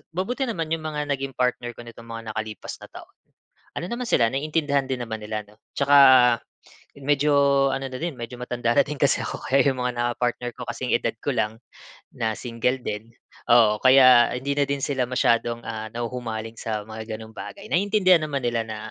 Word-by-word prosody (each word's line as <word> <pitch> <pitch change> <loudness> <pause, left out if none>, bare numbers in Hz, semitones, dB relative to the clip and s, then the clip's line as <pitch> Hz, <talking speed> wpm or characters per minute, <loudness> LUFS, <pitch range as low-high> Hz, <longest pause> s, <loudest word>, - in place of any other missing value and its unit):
mabuti 195 +9 -2
naman 165 -8 -3
'yung 165 - -2
mga 150 -1 -3
naging 135 -1 -3
partner 125 -1 0
ko 120 - -10
nitong 115 0 -12
mga 115 -1 -6
nakalipas 110 -1 -6
na - - -10
taon. - - -12 0.7
Ano 155 - -3
naman 240 +5 -4
sila 115 - +4
naintindihan 145 +2 0
din 130 -1 -2
naman 110 -1 -6
nila, 105 0 -4
'no? 105 - -20 0.2
Tsaka 140 0 +4 1.0
medyo, 140 -1 +3
ano 135 0 -2
na 130 -1 -6
din, 165 -6 -3
medyo 120 +1 -6
matanda 120 -1 -1
na - - +6
din 150 0 -6
kasi 140 0 +2
ako - - -6
kaya 135 +1 +4
'yung 130 - -4
mga 125 0 -1
naka-partnerko 120 0 -2
kasing-edad 120 -1 -1
ko - - -1
lang. 110 0 -1 0.6
Na 110 -2 -1
single 125 +2 -1
din. 110 +2 -5 0.4
Oo, 110 -3 +5
kaya 130 -2 +7
hindi 140 +2 -2
na 145 - +3
din 140 0 -1
sila 135 -2 -1
masyadong 120 -1 +1
ah, 110 -1 -5
nahuhumaling 115 -1 -5
sa 110 -2 -4
mga 110 0 -6
gano'ng 110 0 -12
bagay. 200 - -9
Naiintindihan 185 -3 +3
naman 145 -3 -2
nila 120 -1 0
na, 110 -1 -5
125 Hz, 185 wpm, -24 LUFS, 115-140 Hz, 1.0 s, kaya